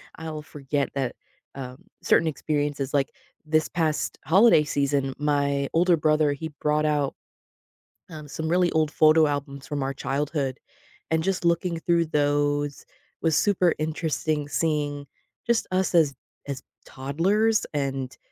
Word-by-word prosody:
I'll 160 Hz, -1 st, -6 dB
forget 145 Hz, -1 st, -3 dB
that, 130 Hz, -3 st, -2 dB, 0.4 s
um, 130 Hz, -1 st, -8 dB, 0.2 s
certain 165 Hz, -, +3 dB
experiences 145 Hz, -2 st, -2 dB
like, 140 Hz, -2 st, +1 dB, 0.3 s
this 155 Hz, 0 st, +1 dB
past 160 Hz, -3 st, -1 dB
holiday 190 Hz, -1 st, +6 dB
season, 140 Hz, -2 st, 0 dB
my 140 Hz, -1 st, 0 dB
older 175 Hz, +1 st, +4 dB
brother, 155 Hz, -1 st, +2 dB
he 160 Hz, +3 st, -5 dB
brought 150 Hz, 0 st, +1 dB
out, 145 Hz, -2 st, 0 dB, 0.9 s
um, 155 Hz, -2 st, -9 dB
some 160 Hz, +2 st, -4 dB
really 175 Hz, +1 st, +2 dB
old 155 Hz, -1 st, +1 dB
photo 155 Hz, +1 st, +5 dB
albums 140 Hz, -1 st, -4 dB
from 145 Hz, -2 st, -2 dB
our 135 Hz, +1 st, -2 dB
childhood, 140 Hz, 0 st, -2 dB, 0.5 s
and 160 Hz, 0 st, +2 dB
just 190 Hz, -2 st, -1 dB
looking 170 Hz, 0 st, +1 dB
through 170 Hz, 0 st, +2 dB
those 145 Hz, -1 st, 0 dB, 0.4 s
was 160 Hz, -2 st, +2 dB
super 185 Hz, -4 st, +3 dB
interesting, 155 Hz, -1 st, -1 dB
seeing 145 Hz, -3 st, -1 dB, 0.4 s
just 235 Hz, -1 st, +1 dB
us 185 Hz, 0 st, +1 dB
as 155 Hz, -4 st, +4 dB, 0.3 s
as 135 Hz, -2 st, -5 dB, 0.2 s
toddlers 195 Hz, +12 st, +1 dB
and 135 Hz, -2 st, -3 dB
150 Hz, 135 wpm, -25 LUFS, 140-160 Hz, 0.9 s, holiday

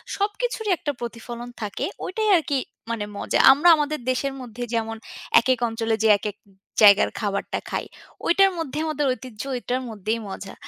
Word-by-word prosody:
সবকিছুরই 425 Hz, +1 st, -1 dB
একটা 290 Hz, -, -2 dB
প্রতিফলন 240 Hz, 0 st, -7 dB
থাকে। 205 Hz, -2 st, -3 dB, 0.2 s
ওইটাই 430 Hz, +3 st, -1 dB
আরকি 290 Hz, -3 st, -1 dB, 0.3 s
মানে 215 Hz, -3 st, -2 dB
মজা। -, -, 0 dB
আমরা 295 Hz, +6 st, +5 dB
আমাদের 300 Hz, -1 st, -1 dB
দেশের 270 Hz, +2 st, -1 dB
মধ্যে 245 Hz, 0 st, -7 dB
যেমন, 225 Hz, -1 st, -1 dB, 0.4 s
একেক 255 Hz, 0 st, +1 dB
অঞ্চলে 225 Hz, 0 st, -1 dB
যে -, -, +5 dB
একেক 205 Hz, 0 st, -5 dB, 0.5 s
জায়গার 200 Hz, -1 st, +7 dB
খাবারটা 200 Hz, -2 st, -2 dB
খাই। -, -, -2 dB, 0.4 s
ওইটার 390 Hz, +2 st, +5 dB
মধ্যে 310 Hz, -4 st, -4 dB
আমাদের 295 Hz, -2 st, -1 dB
ঐতিহ্য, 240 Hz, -3 st, -9 dB
ঐটার 250 Hz, +1 st, -2 dB
মধ্যেই 220 Hz, +1 st, -2 dB
মজা। 195 Hz, 0 st, -7 dB
245 Hz, 150 wpm, -24 LUFS, 225-300 Hz, 0.5 s, জায়গার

